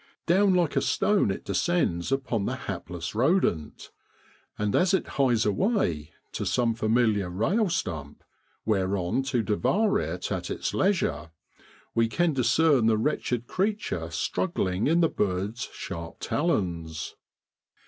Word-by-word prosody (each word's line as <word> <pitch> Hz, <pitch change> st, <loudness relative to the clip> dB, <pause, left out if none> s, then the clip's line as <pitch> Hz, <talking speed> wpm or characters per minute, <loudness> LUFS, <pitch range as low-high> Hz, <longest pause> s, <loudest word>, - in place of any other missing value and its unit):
Down 190 Hz, +2 st, +4 dB
like 175 Hz, -4 st, +1 dB
a -, -, +3 dB
stone 200 Hz, -, +2 dB
it 95 Hz, -, -4 dB
descends 100 Hz, -, 0 dB
upon 125 Hz, -6 st, -1 dB
the -, -, -1 dB
hapless 85 Hz, -2 st, -6 dB
rodent; 120 Hz, -, 0 dB, 0.7 s
and 105 Hz, -1 st, 0 dB
as 185 Hz, +1 st, +4 dB
it 190 Hz, -, -2 dB
hies 125 Hz, -5 st, +2 dB
away 105 Hz, -, 0 dB, 0.2 s
to -, -, -3 dB
some 120 Hz, -2 st, +1 dB
familiar 110 Hz, -3 st, +1 dB
rail 175 Hz, -, +1 dB
stump, 80 Hz, -, -4 dB, 0.4 s
whereon 95 Hz, +1 st, 0 dB
to 130 Hz, -3 st, 0 dB
devour 135 Hz, -, +1 dB
it -, -, -4 dB
at -, -, -3 dB
its -, -, -3 dB
leisure, 185 Hz, -, 0 dB, 0.6 s
we 115 Hz, 0 st, +3 dB
can 170 Hz, +7 st, +1 dB
discern 135 Hz, -1 st, +3 dB
the 110 Hz, -1 st, +3 dB
wretched 125 Hz, -1 st, -1 dB
creature 190 Hz, -, -2 dB
struggling 95 Hz, -, -1 dB
in 165 Hz, +3 st, +3 dB
the 165 Hz, -, +5 dB
bird's 105 Hz, 0 st, -2 dB
sharp 85 Hz, 0 st, -7 dB
talons. 85 Hz, -, -2 dB
115 Hz, 130 wpm, -27 LUFS, -, 0.7 s, the